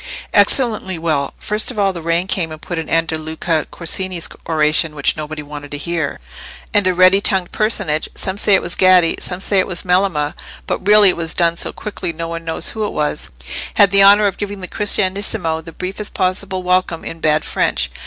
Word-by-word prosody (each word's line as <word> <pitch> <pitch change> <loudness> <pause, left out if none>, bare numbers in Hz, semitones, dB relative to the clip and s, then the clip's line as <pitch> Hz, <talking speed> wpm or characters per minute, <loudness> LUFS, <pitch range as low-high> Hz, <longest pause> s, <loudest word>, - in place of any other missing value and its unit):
"Excellently 215 -8 +2
well. 155 -4 -2
First 210 +1 -2
of 250 - -6
all, 195 -2 +1
the 170 - -7
rain 170 +2 0
came 180 -4 -2
and 155 - -8
put 170 +1 -5
an 160 - -6
end 165 0 +1
to 160 - -2
Luca 160 0 -2
Corsini's 175 -1 -3 0.2
oration, 155 0 +2
which 145 - +1
nobody 155 0 -6
wanted 145 0 -9
to 145 - -4
hear, 165 -1 -3 0.5
and 205 -2 +3
a 185 - +2
ready 185 +2 +5
tongued 190 -3 +1
personage—some 190 -3 -1
say 205 - +5
it - - 0
was 170 - -4
Gaddi, 185 -3 +4
some 180 -1 -1
say 195 0 +3
it - - +1
was 180 -2 -3
Melema, 180 -5 +1 0.3
but 190 - -4
really 210 -1 +7
it 180 - 0
was 165 -2 0
done 170 -1 +2
so - - -2
quickly 195 -4 -4
no 165 +1 -5
one 165 0 -6
knows 165 -1 -2
who 220 - -4
it - - -7
was—had 150 - -1
the 200 0 +5
honour 200 +2 +7
of 200 -2 -1
giving 205 -1 -5
the 185 - -5
Cristianissimo 195 -5 -1
the 165 - -10
briefest 190 +4 -5
possible 185 0 -1
welcome 180 -2 0
in 165 - -7
bad 155 -1 +1
French." - - -1
180 Hz, 205 wpm, -17 LUFS, 160-195 Hz, 0.5 s, really